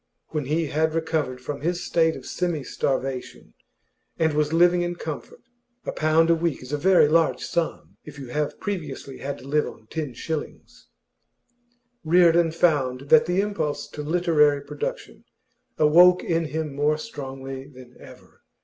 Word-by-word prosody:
When 150 -3 -3
he 160 +4 0
had 155 +2 0
recovered 160 -5 -1
from 140 +2 -5
his 175 +3 -1
state 160 -1 +2
of 130 - -10
semi 170 -5 -2
starvation, 130 -1 -3 0.6
and 160 -2 +1
was 150 0 +1
living 175 +2 +4
in 175 0 -2
comfort 155 -4 -7 0.4
(a - - -2
pound 160 +1 +3
a - - +5
week 165 -5 -2
is 130 +3 -8
a - - +1
very 180 0 +5
large 160 +1 +2
sum 130 - -3
if - - -11
you 135 -3 -8
have 150 +3 -2
previously 150 -9 -5
had 140 +1 -4
to 130 - -13
live 150 +2 +1
on 110 - -11
ten 150 -6 -4
shillings), 160 +4 -6 1.2
Reardon 170 0 +4
found 145 -6 +1
that 235 0 +6
the 180 +2 +2
impulse 200 -8 -3
to 150 - -7
literary 150 -3 +2
production - - -6 0.5
awoke 175 +4 +6
in 165 -1 0
him 155 -1 -4
more 145 +2 +1
strongly 135 -6 -7
than 130 -3 -15
ever. - - -16
155 Hz, 160 wpm, -24 LUFS, 140-170 Hz, 1.2 s, that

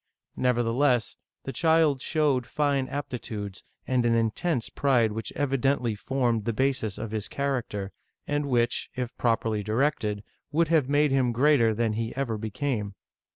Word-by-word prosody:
Nevertheless, 125 0 +1 0.3
the 135 - -5
child 160 -5 +3
showed 145 -6 +1
fine 140 -3 0
ap 145 +1 -4
titudes, 105 -5 -5 0.2
and 130 -2 +1
an 115 -1 +3
intense 115 +4 0
pride 125 -6 +2
which 105 -2 -5
evidently 135 -3 +1
formed 120 0 -1
the 115 - 0
basis 125 -4 0
of 110 -1 -5
his 110 -2 -3
character, 120 -8 -2 0.3
and 145 0 -1
which, 120 -3 +1
if 125 -1 -4
properly 115 -2 0
directed, 110 -2 0 0.3
would 160 +1 +2
have 155 -6 +3
mad^ 145 +1 +3
him 130 -3 +2
greater 125 -2 +4
than 115 -1 0
he 115 +1 -3
ever 120 -5 -2
became. 110 -2 -3
125 Hz, 150 wpm, -27 LUFS, 110-140 Hz, 0.3 s, greater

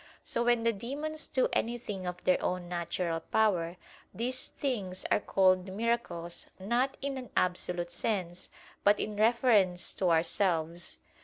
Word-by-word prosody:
So 235 - -1
when 240 -1 +3
the 230 0 +3
demons 290 +8 -4
do 260 -3 +2
anything 220 -5 -2
of 180 0 -5
their 185 - +3
own 180 -1 -1
natural 170 -1 -2
power, 180 -2 +1 0.3
these 255 +3 0
things 195 -9 -3
are - - +5
called 185 -2 +3
"miracles" 195 -6 -2
not 240 +7 0
in 275 -1 -2
an 250 - -9
absolute 180 -1 0
sense, 180 -3 -2 0.3
but 205 0 +5
in 210 - -3
reference 215 -5 +3
to 185 - +1
ourselves. 170 0 +1
195 Hz, 140 wpm, -31 LUFS, 175-235 Hz, 0.3 s, are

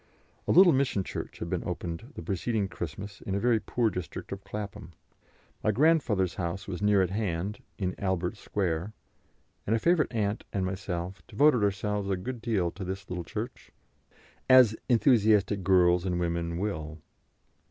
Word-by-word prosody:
A - - +3
little 180 -2 +8
mission 130 -7 +1
church - - -6
had - - -5
been - - -2
opened 90 - -5
the - - -7
preceding 100 +1 -1
Christmas 95 +4 -7
in 95 - -3
a - - +1
very 115 0 +3
poor 115 0 0
district 90 -4 -6
of 100 0 -6
Clapham. 105 -3 -7 0.7
My - - +2
grandfather's 125 - +2
house 85 +3 -4
was 95 -1 -5
near 105 -2 +4
at 90 - -2
hand, 100 -1 -2 0.2
in 90 -2 -1
Albert 95 -1 -1
Square, 95 -1 -2 0.7
and 110 - +3
a - - +3
favourite 170 +3 +2
aunt 105 -3 -1
and 95 -2 -1
myself 90 -1 -4
devoted 140 -6 +4
ourselves 100 0 -1
a 95 - +1
good 115 +6 -5
deal 105 -7 0
to 100 - -7
this 95 +1 -5
little 90 -1 -3
church, 110 +7 -6 0.8
as 130 -4 +7
enthusiastic 105 -4 +4
girls 90 -1 +4
and 90 -2 -1
women 85 -1 -1
will. 80 -6 -3
100 Hz, 165 wpm, -28 LUFS, 90-110 Hz, 0.8 s, little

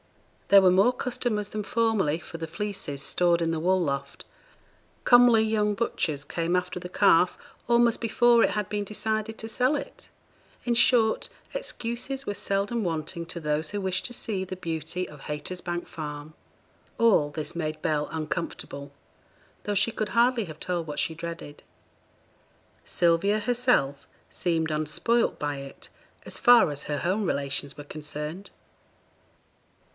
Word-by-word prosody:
There 200 -1 +7
were 185 - +6
more 195 +6 +5
customers 240 -4 -2
than 215 -1 -4
formerly 215 -8 +1
for 170 - -9
the 165 0 -5
fleeces 165 -6 -4
stored 175 +1 +2
in 165 -1 +1
the 165 - -1
wool 185 +3 +2
loft; 140 -4 -3 0.8
comely 245 -2 +7
young 210 -1 +1
butchers 155 -10 -1
came 170 +3 -1
after 180 0 -3
the 180 0 -8
calf 180 -2 +4 0.3
almost 235 -1 +4
before 235 +1 +4
it - - +4
had 210 0 -2
been 210 -1 -2
decided 215 +2 -3
to 225 - -5
sell 255 +5 +1
it; 280 - -9 0.6
in 240 - +2
short, 235 -2 +4 0.2
excuses 265 - -4
were 205 - -2
seldom 200 +3 -1
wanting 170 0 -3
to 170 +1 -5
those 150 0 -1
who 205 - -3
wished 190 -1 -1
to 245 - -3
see 205 -5 -2
the 185 0 -6
beauty 165 +1 -3
of 145 -2 -13
Haytersbank 175 +4 -4
Farm. 150 -1 -7 0.6
All 205 -11 +4
this 150 +3 -4
made 155 -2 -3
Bell 150 -2 0
uncomfortable, 155 -3 -4 0.7
though 205 - -2
she 200 +4 +3
could 215 -1 -3
hardly 235 -1 +3
have 155 -2 -10
told 175 -2 -2
what 150 - -4
she 165 - 0
dreaded. 165 -2 -8 1.2
Sylvia 175 +5 +2
herself 240 - +1 0.2
seemed 165 -3 -1
unspoilt 155 +10 +1
by 145 -1 -2
it 135 0 -9 0.4
as - - -3
far 240 - +6
as 145 0 -4
her 145 - -2
home 185 +8 0
relations 140 -4 -2
were 145 - -7
concerned. 150 +5 -6
180 Hz, 150 wpm, -27 LUFS, 155-220 Hz, 1.2 s, There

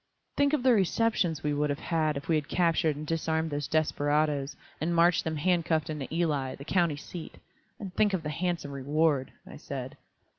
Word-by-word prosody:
"Think 285 +1 +2
of 290 -5 +1
the 255 -1 +6
receptions 190 -5 +1
we 150 0 0
would 150 +1 0
have 145 - -1
had 155 -3 0
if 140 - -7
we 165 - +2
had 155 -2 0
captured 165 -3 +2
and 150 +1 -6
disarmed 160 0 -1
those 145 0 -2
desperadoes, 150 -2 +1 0.3
and 170 +2 0
marched 170 +1 +4
them 160 -1 -2
handcuffed 160 -1 +1
into 150 -3 -5
Ely, 150 -6 0
the 140 - -11
county 170 -4 +1
seat! 165 +3 -8 0.4
And 195 -3 -7
think 210 +1 +3
of 170 - -4
the 150 - -3
handsome 170 -3 -2
reward," 140 0 +1
I - - -10
said. - - -6
160 Hz, 190 wpm, -29 LUFS, 145-175 Hz, 0.4 s, the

